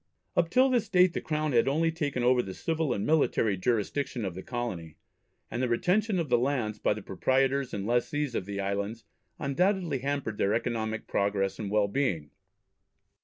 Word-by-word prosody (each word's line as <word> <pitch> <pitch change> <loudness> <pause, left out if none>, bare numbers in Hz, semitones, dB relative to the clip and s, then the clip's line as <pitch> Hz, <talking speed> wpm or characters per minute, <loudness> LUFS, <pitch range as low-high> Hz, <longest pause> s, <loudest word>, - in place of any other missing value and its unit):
Up 170 -1 +2
till 255 +7 +4
this 230 -5 +1
date 180 -2 +5
the - - -2
Crown 155 -1 -1
had 120 -1 +3
only 160 +4 +2
taken 145 -6 -2
over 125 0 +4
the 95 -5 -7
civil 160 -4 -1
and 100 -4 -1
military 140 -9 +2
jurisdiction 115 +4 -1
of 95 - -3
the 95 - -7
colony, 95 -10 -5 0.6
and 120 - -2
the 130 - +1
retention 190 - +1
of 165 -3 -1
the 120 -2 +3
lands 120 -5 -1
by - - +1
the 105 - -8
proprietors 130 +7 +1
and 100 -1 -4
lessees 125 +4 0
of 95 - -3
the 100 0 -4
islands 100 +3 -3 0.3
undoubtedly 180 0 0
hampered 135 -5 -3
their 100 +2 +2
economic 110 -2 -2
progress 100 -1 0
and 105 -3 -3
well 105 0 +2
being. 100 - -1
125 Hz, 180 wpm, -29 LUFS, 105-150 Hz, 0.6 s, date